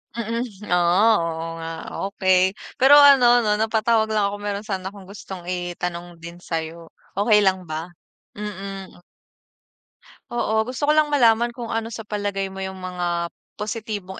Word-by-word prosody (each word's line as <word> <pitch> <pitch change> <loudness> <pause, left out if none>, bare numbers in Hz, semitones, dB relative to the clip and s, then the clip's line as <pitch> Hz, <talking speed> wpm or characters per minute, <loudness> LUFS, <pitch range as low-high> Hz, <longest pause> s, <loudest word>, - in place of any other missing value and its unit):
Mm, 230 +1 -2 0.2
oh, 180 +5 +4
oo 165 -1 -3
nga, 165 0 -6 0.4
okey. 190 -1 +2 0.2
Pero 270 +3 +6
ano 250 -4 +7
'no, 210 -2 +1
napatawag 220 +1 +2
lang 205 -2 +2
ako 205 - -5
meron 205 -1 -4
sana 190 -2 -5
akong 195 -2 -13
gustong 195 -2 -9
itanong 175 -1 -5
din 170 +1 -9
sayo, 165 -1 -5 0.3
okey 210 +1 +4
lang 190 -2 +1
ba? 160 +2 -5 0.5
Mm. 195 -3 -7 1.3
Oo. 220 -2 +1
Gusto 255 +4 -3
ko - - +5
lang 305 -1 +3
malaman 235 -4 +4
kung 235 -1 -7
ano 225 0 -2
sa 225 -1 -8
palagay 205 -2 -2
mo 190 0 -7
yung 190 0 -6
mga 175 -2 -2 0.3
positibong 210 -3 -5
200 Hz, 150 wpm, -22 LUFS, 180-225 Hz, 1.3 s, ano